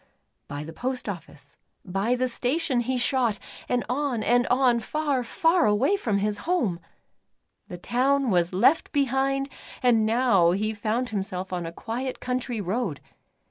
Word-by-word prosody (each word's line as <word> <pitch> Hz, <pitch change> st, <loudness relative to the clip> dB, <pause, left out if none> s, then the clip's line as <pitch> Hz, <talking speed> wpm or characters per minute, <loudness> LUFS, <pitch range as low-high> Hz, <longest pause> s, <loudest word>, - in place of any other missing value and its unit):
By 145 Hz, +1 st, -5 dB
the 160 Hz, +2 st, -9 dB
post 255 Hz, +7 st, -3 dB
office, 150 Hz, -7 st, -8 dB, 0.3 s
by 195 Hz, +6 st, 0 dB
the 255 Hz, +1 st, 0 dB
station 260 Hz, +3 st, 0 dB
he 255 Hz, +2 st, -1 dB
shot, 245 Hz, -4 st, +1 dB, 0.3 s
and 245 Hz, -1 st, 0 dB
on 250 Hz, -2 st, -1 dB
and 245 Hz, +2 st, +3 dB
on, 250 Hz, -2 st, +3 dB
far, 285 Hz, +1 st, -1 dB
far 330 Hz, +6 st, +2 dB
away 210 Hz, -, +3 dB
from 225 Hz, -, 0 dB
his 205 Hz, +1 st, -1 dB
home 230 Hz, -, +1 dB
I -, -, -28 dB, 0.8 s
The 180 Hz, -, -7 dB
town 260 Hz, +6 st, +1 dB
was 175 Hz, -2 st, +2 dB
left 235 Hz, -, +3 dB
behind, 275 Hz, 0 st, +1 dB, 0.4 s
and 235 Hz, -3 st, +4 dB
now 215 Hz, -7 st, +3 dB
he 215 Hz, +3 st, -1 dB
found 220 Hz, +4 st, -1 dB
him 205 Hz, -3 st, -1 dB
self 185 Hz, -1 st, -5 dB
on 175 Hz, -2 st, -3 dB
a -, -, -5 dB
quiet 245 Hz, +8 st, -4 dB
country 250 Hz, -2 st, -2 dB
road. 195 Hz, -, -2 dB
240 Hz, 160 wpm, -26 LUFS, 200-260 Hz, 0.8 s, and